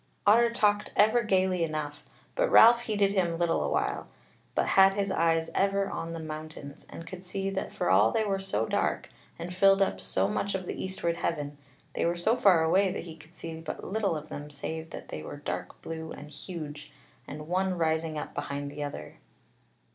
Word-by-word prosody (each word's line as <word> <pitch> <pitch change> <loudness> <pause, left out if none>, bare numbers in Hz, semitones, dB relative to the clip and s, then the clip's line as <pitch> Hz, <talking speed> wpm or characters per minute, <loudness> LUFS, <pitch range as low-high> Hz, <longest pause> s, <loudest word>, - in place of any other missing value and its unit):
Otter 235 +3 +6
talked 210 -3 +1
ever 220 +4 +5
gaily 185 -4 +2
enough; 155 -2 -4 0.3
but - - +1
Ralph 235 +1 +8
heeded 205 -2 +2
him 175 -4 +1
little 170 -1 +1
a - - -1
while, - - -1 0.5
but - - +1
had 195 0 +6
his 200 -1 0
eyes 165 -1 +1
ever 195 0 +1
on 165 0 -4
the 165 - -5
mountains, 155 -2 -8
and 165 - -9
could 185 +1 -9
see 195 +1 -3
that 190 - -3
for - - -2
all 100 +4 +6
they 220 - +1
were 195 -1 0
so 115 - -1
dark, - - -1 0.3
and 175 +1 -6
filled 195 +1 +5
up 195 - +1
so - - 0
much 200 -1 -1
of 185 -1 -3
the - - -4
eastward 170 -3 -2
heaven, 150 -4 -2 0.4
they - - -1
were 170 +1 +1
so 215 +7 +2
far 185 -9 +5
away 185 +4 +3
that - - -4
he 165 -2 -9
could 160 +2 -17
see 160 0 -6
but 160 - -6
little 200 -5 0
of 150 +1 -9
them 145 +1 -7
save 160 +3 -5
that - - -9
they 75 - -5
were 110 - -7
dark 145 - -5
blue 160 0 -6
and 150 +1 -9
huge, 150 -2 -7 0.4
and 150 +2 -7
one 185 +1 0
rising 160 -1 0
up - - -5
behind 140 0 -4
the 150 +1 -7
other. 140 - -6
170 Hz, 200 wpm, -29 LUFS, 155-195 Hz, 0.5 s, Ralph